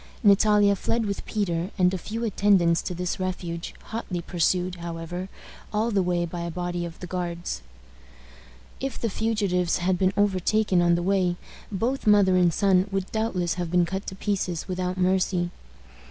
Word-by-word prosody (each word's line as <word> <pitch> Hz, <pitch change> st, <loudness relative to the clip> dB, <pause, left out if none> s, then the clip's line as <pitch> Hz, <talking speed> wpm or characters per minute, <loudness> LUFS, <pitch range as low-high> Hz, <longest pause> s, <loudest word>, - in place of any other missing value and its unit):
Natalia 205 Hz, 0 st, +5 dB
fled 230 Hz, +4 st, -1 dB
with 200 Hz, -1 st, -3 dB
Peter 180 Hz, -4 st, -1 dB
and 180 Hz, -1 st, +3 dB
a -, -, 0 dB
few 225 Hz, +6 st, -5 dB
attendants 195 Hz, -5 st, +3 dB
to 180 Hz, -, -4 dB
this 180 Hz, +1 st, -3 dB
refuge, 175 Hz, -2 st, -4 dB
hotly 220 Hz, -5 st, -4 dB
pursued, 180 Hz, +1 st, 0 dB
however, 170 Hz, +2 st, -5 dB, 0.4 s
all 220 Hz, +2 st, 0 dB
the 200 Hz, -2 st, +2 dB
way 175 Hz, -1 st, 0 dB
by 170 Hz, +1 st, -6 dB
a 170 Hz, 0 st, -3 dB
body 175 Hz, 0 st, -3 dB
of 165 Hz, -1 st, -9 dB
the -, -, -4 dB
Guards. 175 Hz, -, -4 dB, 1.2 s
If 270 Hz, -2 st, -3 dB
the 230 Hz, -, -1 dB
fugitives 195 Hz, -6 st, 0 dB
had 180 Hz, 0 st, 0 dB
been 185 Hz, 0 st, +3 dB
overtaken 205 Hz, -1 st, +2 dB
on 175 Hz, 0 st, +4 dB
the 175 Hz, -, -1 dB
way, 185 Hz, -2 st, +2 dB, 0.4 s
both 230 Hz, +6 st, -1 dB
mother 200 Hz, -3 st, +5 dB
and 180 Hz, -2 st, +4 dB
son 190 Hz, +1 st, +3 dB
would 195 Hz, -1 st, -2 dB
doubtless 195 Hz, -6 st, 0 dB
have 175 Hz, -, -3 dB
been 175 Hz, 0 st, +3 dB
cut 190 Hz, +3 st, -4 dB
to 190 Hz, -, -5 dB
pieces 190 Hz, -4 st, -2 dB
without 185 Hz, 0 st, -2 dB
mercy. 180 Hz, -1 st, +1 dB
185 Hz, 170 wpm, -25 LUFS, 175-200 Hz, 1.2 s, Natalia